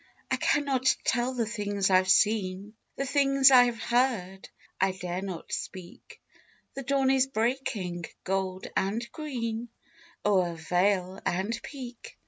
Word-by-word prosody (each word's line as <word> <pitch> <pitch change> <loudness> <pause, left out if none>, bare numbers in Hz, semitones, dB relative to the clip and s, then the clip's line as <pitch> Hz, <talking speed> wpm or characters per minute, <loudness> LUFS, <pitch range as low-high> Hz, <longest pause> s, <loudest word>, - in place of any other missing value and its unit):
I - - +4
can 290 - +1
not 265 -2 +2
tell 250 +1 0
the 235 -2 0
things 205 -3 -1
I've 185 0 +4
seen, 200 0 +2 0.2
The 275 - -2
things 275 -1 +4
I've 245 -2 +5
heard 225 -6 0 0.3
I 190 0 +2
dare 180 0 -4
not 185 -4 -6
speak 180 -2 -7 0.5
The 275 - -5
dawn 270 0 +2
is 265 0 +3
breaking, 220 -8 -2 0.2
gold 190 -1 -2
and 215 +5 0
green, 240 -6 -4 0.6
O'er 185 -4 +2
vale 180 +3 0
and 190 +6 -1
peak. 250 -4 -9
215 Hz, 130 wpm, -28 LUFS, 185-255 Hz, 0.6 s, I've